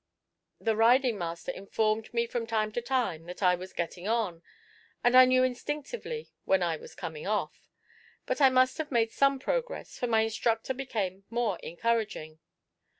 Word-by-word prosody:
The 225 -1 +1
riding 235 0 +4
master 170 -1 -4
informed 215 +2 -1
me 235 0 +1
from 230 0 -3
time 215 -1 0
to 240 - -2
time 240 -10 -1
that 180 +4 -7
I 180 -1 +5
was 185 +1 -5
getting 175 +2 -4
on, 215 -7 0 0.6
and 245 +1 +4
I 255 0 +10
knew 255 0 +4
instinctively 295 - -4
when 190 -2 +2
I 170 -2 0
was - - -12
coming 160 -2 -6
off; 210 0 -2 0.6
but - - -2
I 270 - +8
must 255 +2 +3
have 315 - -3
made 230 -3 +2
some 275 0 +3
progress, - - -3
for 245 - 0
my 225 -1 +3
instructor 225 +2 0
became 205 -8 -3
more 230 -6 -1
encouraging. 205 -6 -2
225 Hz, 165 wpm, -29 LUFS, 190-255 Hz, 0.6 s, I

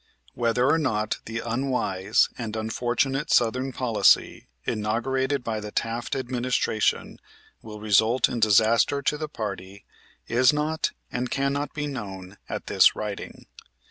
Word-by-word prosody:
Whether 120 +1 +1
or 160 +3 +3
not 110 -8 -1
the 115 +1 -4
unwise 115 -5 +1
and 115 -3 -5
unfortunate 120 +6 -1
southern 125 +3 +2
policy 120 -4 +2 0.2
inaugurated 130 +5 -1
by 110 -2 -2
the 105 0 -7
Taft 115 +4 -2
Administration 125 -4 -1 0.4
will 105 -1 -9
result 110 +4 +3
in 120 - -4
disaster 115 +6 +3
to 150 - +1
the 155 0 -5
party 100 - -6 0.4
is 125 +1 +4
not 150 +2 -1 0.2
and 125 0 -2
cannot 140 +2 -1
be 145 -1 -2
known 100 -8 -7
at - - -5
this - - +5
writing. 105 -2 -6
120 Hz, 130 wpm, -25 LUFS, 110-130 Hz, 0.4 s, this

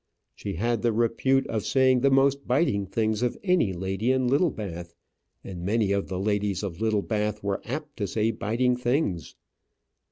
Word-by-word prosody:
She 100 - -6
had 115 +5 0
the 120 - +2
repute 120 +4 +1
of 110 -3 -2
saying 130 +2 +3
the 140 +2 +3
most 135 +1 +2
biting 125 - +1
things 110 +2 -1
of 125 -1 0
any 180 - +2
lady 95 +6 -1
in 130 -1 +1
Littlebath 105 - -1 0.5
and 90 -3 -7
many 105 +2 +1
of 100 0 0
the 95 -1 -4
ladies 100 -1 -1
of 95 -1 -5
Littlebath 105 -1 -1
were 100 -1 -1
apt 150 +3 -6
to 100 - -2
say 110 +4 0
biting 115 +4 0
things. 125 - -1
110 Hz, 165 wpm, -26 LUFS, 100-130 Hz, 0.5 s, saying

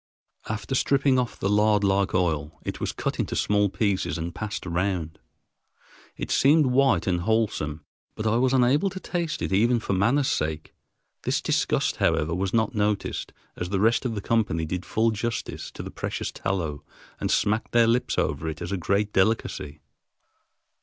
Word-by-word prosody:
After 110 +1 -3
stripping 135 0 +3
off 125 -1 -3
the - - 0
lard 105 0 +3
like 100 -1 +2
oil, 80 -4 -1
it - - -4
was - - -2
cut - - -3
into - - -1
small 105 -1 +2
pieces 100 -3 0
and 85 +1 -4
passed 105 -3 -5
round. 90 -3 -2 1.0
It - - -4
seemed 150 +2 +5
white 130 -7 +3
and 90 -2 0
wholesome, 85 -8 -1 0.3
but 110 - -5
I 110 +1 +2
was 130 +1 +2
unable 135 +8 +3
to 190 - -7
taste 170 -4 -3
it - - -2
even 115 +5 +3
for 105 - -2
manner's 120 +9 +2
sake. 80 0 -2 0.5
This - - 0
disgust, - - 0
however, 80 +2 +1
was 95 +2 -1
not 110 -2 +1
noticed, 105 -1 -1 0.2
as 90 - -4
the 100 -1 0
rest 110 +3 +3
of 120 -4 -2
the 100 - -3
company 105 -8 0
did 90 +3 -4
full 115 +1 +2
justice 115 +2 -4
to - - -8
the - - -7
precious - - -4
tallow 85 -7 -3 0.4
and - - -2
smacked 105 +2 +1
their 120 -1 +5
lips 120 +2 +1
over 75 +3 0
it 80 - -6
as 85 +1 -5
a 100 - 0
great 100 +4 0
delicacy. 95 -7 0
105 Hz, 175 wpm, -25 LUFS, 90-115 Hz, 1.0 s, seemed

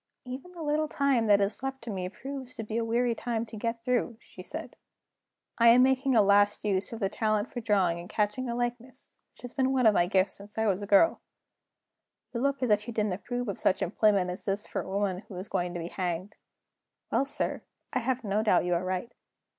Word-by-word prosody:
"Even 260 +8 -7
the 340 -2 -7
little 305 +1 +1
time 275 -6 +1
that 205 -1 +6
is 200 +3 -1
left 270 0 -3
to 230 - -5
me 185 -2 -3
proves 265 +3 -7
to 225 - -5
be 215 +1 -5
a 230 - +1
weary 235 +1 +1
time 230 0 -2
to 220 - -11
get 230 +2 -3
through," 245 -2 0
she - - -13
said. - - -7 0.8
"I 235 - +6
am 240 +2 +8
making 265 0 +2
a 215 - +6
last 205 +1 +3
use 195 -2 0
of 230 - -6
the 195 - +1
talent 215 +1 0
for 240 - -4
drawing 190 -6 +2
and 175 - -9
catching 215 +4 -1
a 235 - -2
likeness, 245 +2 -5 0.2
which - - -19
has 245 - -7
been 265 -1 +1
one 260 -2 +2
of 215 - +7
my 175 -3 +3
gifts 190 +1 +1
since 205 +2 -11
I 220 - +1
was 200 -2 +1
a 205 - -5
girl. 205 +12 +4 1.1
You 235 - -2
look 275 -1 0
as 245 - +1
if 210 +1 +2
you 235 - -4
didn't 210 -3 +1
approve 245 +5 -4
of 200 - -4
such - - +2
employment 200 -4 +2
as 180 - -6
this 200 +1 -1
for - - -3
a - - -9
woman 195 -2 -1
who 195 - -9
is 185 +3 -6
going 175 -3 -1
to - - -3
be 170 +1 -5
hanged. 180 +2 -3 0.8
Well, - - +3
sir, 275 - -2 0.3
I 255 - +2
have 255 0 -1
no 205 0 0
doubt 205 -5 +3
you 180 - +1
are 170 +1 0
right." 185 +5 -3
220 Hz, 235 wpm, -29 LUFS, 200-250 Hz, 1.1 s, am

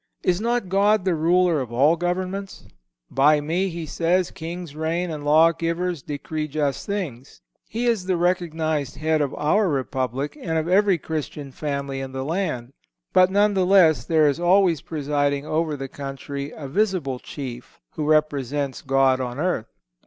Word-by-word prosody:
Is 180 +2 +1
not 235 -2 0
God 200 +1 +3
the 185 - +2
Ruler 170 0 +2
of 125 -3 -6
all 140 +7 +4
governments? 185 +3 -3 0.5
"By 150 +3 +4
Me," 170 +6 -1
He 170 -1 -5
says, 170 +4 0
"kings 170 -1 -7
reign, 165 +3 -1
and 150 -2 -5
lawgivers 165 +2 +2
decree 150 +2 -4
just 145 -2 -2
things."(155) 160 - -7
He 235 +3 -2
is 230 -6 +1
the 185 -2 +1
recognized 160 -5 -1
Head 155 +1 +1
of 140 - -1
our 190 +6 +2
Republic, 135 -1 -2
and 160 -6 -1
of 160 +1 -1
every 195 0 +4
Christian 150 -3 -5
family 140 -1 -3
in 135 -1 -6
the 130 0 -3
land; 140 -7 -2 0.4
but, 185 0 +6
nevertheless, 190 - +4
there 155 +1 +3
is 145 +2 0
always 175 -3 +3
presiding 145 -2 -1
over 155 -1 -1
the 135 0 -5
country 140 +1 -6
a 145 - -8
visible 180 -7 0
chief, 125 -4 -8
who 155 - -4
represents 145 -3 0
God 135 -1 +2
on 125 0 -4
earth. 155 -8 -1
155 Hz, 155 wpm, -23 LUFS, 140-180 Hz, 0.5 s, but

